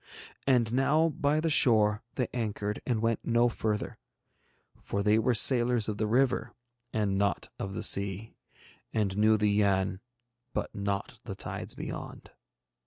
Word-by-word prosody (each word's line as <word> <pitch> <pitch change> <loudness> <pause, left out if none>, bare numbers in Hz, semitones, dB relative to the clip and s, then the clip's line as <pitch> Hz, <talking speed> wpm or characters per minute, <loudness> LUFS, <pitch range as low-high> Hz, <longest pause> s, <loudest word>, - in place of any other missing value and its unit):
And 120 -4 +2
now 150 +5 +3
by 150 0 0
the 160 0 0
shore 105 -5 +4
they 125 - -1
anchored 105 -3 -3
and 115 -3 0
went 115 0 +1
no 120 +1 +2
further, 110 -2 -3 0.8
for 100 - -3
they 105 +1 +3
were 120 +2 +1
sailors 120 0 +4
of 105 -1 -4
the 110 - 0
river 120 0 +1 0.4
and 100 -3 0
not 100 0 -1
of 95 0 -5
the - - -3
sea, 100 +2 +2 0.6
and 100 -3 -1
knew 110 +1 +4
the 105 -1 +1
Yann 95 -2 +1 0.5
but - - -3
not 100 0 -4
the - - -6
tides - - -6
beyond. - - -8
110 Hz, 150 wpm, -29 LUFS, 100-120 Hz, 0.8 s, shore